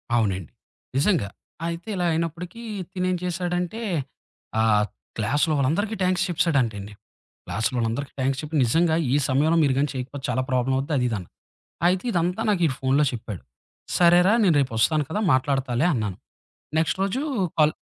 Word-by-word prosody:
అవునండి. 95 -7 0 0.5
నిజంగా. 150 - +2 0.4
అయితే 170 +4 -5
ఇలా 180 -1 0
అయినప్పటికీ 170 +6 -3 0.3
తినేం 185 0 0
చేశాడంటే, 180 +4 -2 0.8
ఆ - - +3 0.5
క్లాస్‌లో 145 +9 +1
వాళ్ళందరికీ 170 +11 0
థ్యాంక్స్ 185 0 +2
చెప్పేశాడంటండి. 120 - 0 0.5
క్లాస్‌లో 115 +3 -1
వాళ్ళందరికి 120 +5 -2
థ్యాంక్స్ 135 +1 0
చెప్పి 155 +1 -6
నిజంగా 160 +7 +3 0.2
ఈ - - +4
సమయంలో 150 +5 +3
మీరు 140 -3 +3
గాని 145 +1 +2
చేయకపోతే 130 +2 -5
చాలా 130 +1 +1
ప్రాబ్లమ్ 130 +1 +1
అవుద్ది 140 +3 -2
అదీదని. 115 -8 -1 0.6
అయితే 185 +1 +1
ఇదంతా 180 +3 0
నాకు 190 -4 +1
ఈ - - 0
ఫోనులో 135 +3 +2
చెప్పాడు. 110 -5 -6 0.6
సరేరా 175 +3 +6
నేను 170 -6 +4
రేపు 130 -4 0
వస్తాను 155 +6 +3
కదా! 185 - -1
మాట్లాడతాలే 130 0 +1
అన్నాను. 105 -6 -2 0.6
నెక్స్ట్ 160 +3 +1
రోజు 200 +7 0 0.4
కాల్ 155 0 +5
150 Hz, 140 wpm, -24 LUFS, 125-175 Hz, 0.8 s, సరేరా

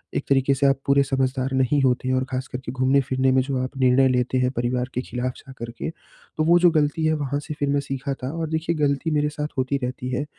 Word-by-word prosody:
एक - - 0
तरीके 135 0 +3
से 140 - 0
आप 135 0 +2
पूरे 140 0 +4
समझदार 130 0 -1
नहीं 130 +2 +2
होते 130 0 +1
हैं 130 - +2
और 130 - +1
ख़ास 130 +1 -3
करके 125 -2 -6
घूमने-फिरने 130 0 +2
में 130 0 +4
जो 135 -1 -2
आप 130 +2 -6
निर्णय 130 +1 +4
लेते 125 0 +1
हैं, 125 0 +1
परिवार 125 +1 -1
के 125 - -1
खिलाफ 125 0 -3
जाकर 120 -3 -9
के। - - -2 0.5
तो 155 - +2
वो 170 +1 +6
जो 175 0 +6
गलती 155 0 +1
है 155 - +3
वहाँ 145 -1 -2
से 150 - -6
फिर 145 -1 0
मैं 145 0 +2
सीखा 135 0 -4
था 130 - -2
और 160 -2 -2
देखिए 160 +1 -1
गलती 145 +2 0
मेरे 150 0 +1
साथ 150 0 -4
होती 130 +2 0
रहती 125 0 -4
है, 130 +3 -2
135 Hz, 250 wpm, -23 LUFS, 130-145 Hz, 0.5 s, वो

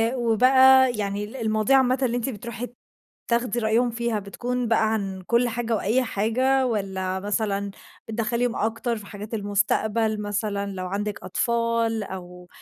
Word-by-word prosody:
وبقى 260 +2 +5
يعني 200 0 -2
ال 210 +5 -8
المواضيع 220 +1 +2
عامةً 255 0 +3
اللي 245 -2 +1
أنتِ 245 +2 -2
بترُوحي 235 +1 -6 0.6
تاخدي 235 0 +1
رأيهم 230 +2 +2
فيها 235 -2 -1
بتكُون 245 +5 -3
بقى 220 -1 +2
عن 195 -3 -3
كل 235 +1 +3
حاجة 230 0 -1
وأي 220 +5 +1
حاجة 255 +5 +1
والّا 190 -4 -2
مثلًا 200 0 -1 0.4
بتدخّليهم 230 +2 -1
أكتر 225 +2 -1
في 210 - -10
حاجات 205 +2 -9
المستقبَل 210 +1 0
مثلًا 205 -1 -2
لو 185 -1 -4
عندِك 205 +2 -3
أطفال 230 +1 0
أو 180 -2 -9
220 Hz, 145 wpm, -24 LUFS, 205-240 Hz, 0.6 s, وبقى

